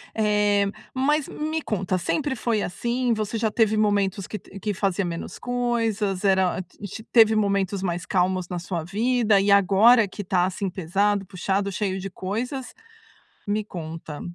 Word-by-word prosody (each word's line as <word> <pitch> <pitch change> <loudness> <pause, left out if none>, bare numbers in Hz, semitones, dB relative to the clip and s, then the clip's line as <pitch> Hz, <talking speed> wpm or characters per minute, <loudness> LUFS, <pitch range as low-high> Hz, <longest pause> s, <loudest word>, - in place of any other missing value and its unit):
Eh, 210 -2 +2 0.3
mas 285 +3 +1
me 310 +1 -3
conta: 190 -5 -1
Sempre 270 - -1
foi 220 -2 0
assim? 240 +4 -1
Você 215 +1 -2
já 220 -1 0
teve 220 -1 +2
momentos 200 -2 +1
que 210 - -5
t 195 - -12
que 210 +1 -2
fazia 195 -1 0
menos 170 -1 -5
coisas? 230 -5 -1
Era, 190 -2 +3
hã, - - -2
ti 200 +4 -9
teve 220 -2 +6
momentos 200 -2 0
mais 175 -1 -2
calmos 185 -1 0
na 180 - -3
sua 175 -2 -4
vida 215 +2 +2
e 200 +1 +2
agora 200 +3 +6
que 205 +2 -7
tá 180 -1 +2
assim 190 +1 -2
pesado, 195 +3 0
puxado, 195 +2 -1
cheio 190 -1 -2
de 195 +1 -5
coisas? 245 +9 -4 0.7
Me 210 +1 0
conta. 160 -5 -7
200 Hz, 165 wpm, -24 LUFS, 185-220 Hz, 0.7 s, teve